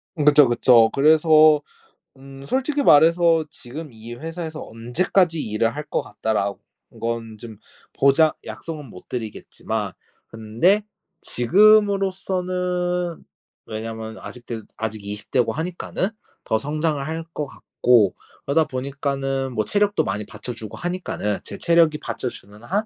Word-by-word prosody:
그쵸, 150 -2 +6
그쵸. 120 -1 +5
그래서 155 +1 +5 0.6
음 135 0 -12
솔직히 270 - 0
말해서 165 - +5
'지금 150 +2 -9
이 115 +1 -10
회사에서 160 +3 -6
언제까지 160 - 0
일을 115 +1 -1
할 150 - -4
것 - - 0
같다.'라는 100 -2 -2 0.5
건 115 -1 -3
좀 110 -1 -10 0.4
보장 140 +3 +4
약속은 155 -3 -7
못 90 - -14
드리겠지만 115 -4 -4 0.4
근데 115 - +1 0.4
지금으로서는 185 - +2 0.4
왜냐하면 110 0 -6
아직도, 120 -2 -8
아직 110 -2 -4
20 105 +1 -7
대고 120 -3 +2
하니까는 175 - -3 0.4
더 110 - +1
성장을 150 +2 -1
할 160 +2 -4
것 150 - -3
같고 120 -7 +2 0.3
그러다 160 +3 +3
보니까는 135 0 -3
뭐 110 -2 -1
체력도 205 - +1
많이 105 +2 -3
받쳐 125 - -8
주고 110 -3 -8
하니까는 175 - -3
'제 - - -7
체력이 165 -2 +3
받쳐주는 105 -6 -6
한 200 - -1
140 Hz, 280 characters per minute, -22 LUFS, 115-170 Hz, 0.6 s, 그쵸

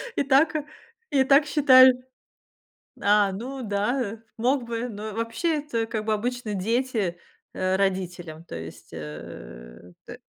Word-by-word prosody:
и - - +1
так 280 +4 +4 0.6
и 270 -2 +4
так 275 +2 +5
считали. 260 -4 +7 1.1
А, 205 -1 +3
ну 255 +7 -6
да, 210 +5 -1
э, 220 0 -5 0.2
мог 250 +3 +1
бы, 235 +1 -3
но 215 -1 -6
вообще, 230 - -1
это 235 -6 -2
как 220 -1 -4
бы 220 - 0
обычно 235 0 -2
дети, 215 -3 -1 0.4
э, 185 0 0
родителям, 180 -4 -2
то - - -10
есть 80 0 -10
э, 75 -2 -10
тэ - - -9
220 Hz, 140 wpm, -25 LUFS, 190-255 Hz, 1.1 s, считали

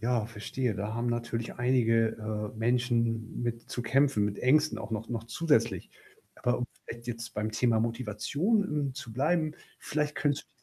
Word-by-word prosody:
Ja, 115 -2 +1
verstehe. 115 +1 -2
Da 105 +2 -3
haben 115 +1 -1
natürlich 120 -1 -2
einige, 115 -3 +3 0.4
äh, 110 - -12
Menschen 115 -1 +1
mit 120 -1 -2
zu - - -2
kämpfen, 125 -2 +3
mit 105 -1 -2
Ängsten 150 +4 +4
auch 110 - -6
noch 110 +1 -3
noch 115 -2 -3
zusätzlich. 155 +5 +1 0.5
Aber, 125 0 0
um 125 - -1 0.2
vielleicht 120 0 -8
jetzt 115 -1 -5
beim 105 +1 -2
Thema 115 0 +3
Motivation, 125 - +1
hm, 145 -6 -1
zu 130 -5 -7
bleiben. 155 +4 +1 0.2
Vielleicht 150 -1 -1
könntest 145 -2 0
120 Hz, 165 wpm, -30 LUFS, 115-135 Hz, 0.5 s, Ängsten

